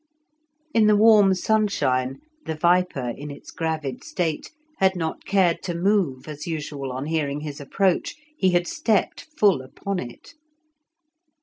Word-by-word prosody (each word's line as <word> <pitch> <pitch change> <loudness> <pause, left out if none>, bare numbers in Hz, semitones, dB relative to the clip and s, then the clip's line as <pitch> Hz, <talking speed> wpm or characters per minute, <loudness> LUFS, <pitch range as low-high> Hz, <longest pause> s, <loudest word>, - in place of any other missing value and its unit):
In 220 -2 +4
the 210 - +5
warm 205 -3 +6
sunshine 140 -12 0 0.3
the 160 - -2
viper, 170 -7 +1
in 145 +1 -8
its 140 - -10
gravid 155 -5 -3
state, 165 -4 -2 0.3
had 190 0 +3
not 160 -2 -4
cared 185 -4 +2
to 175 -2 -3
move 175 -8 0
as 150 +2 -7
usual 145 -4 -4
on 130 +2 -4
hearing 150 -2 -1
his 145 -1 -6
approach; 185 +6 0 0.2
he 190 -10 +2
had 175 -1 +2
stepped 225 - 0
full 200 - +4
upon 185 +9 -5
it. 120 - -9
165 Hz, 140 wpm, -24 LUFS, 145-195 Hz, 0.3 s, warm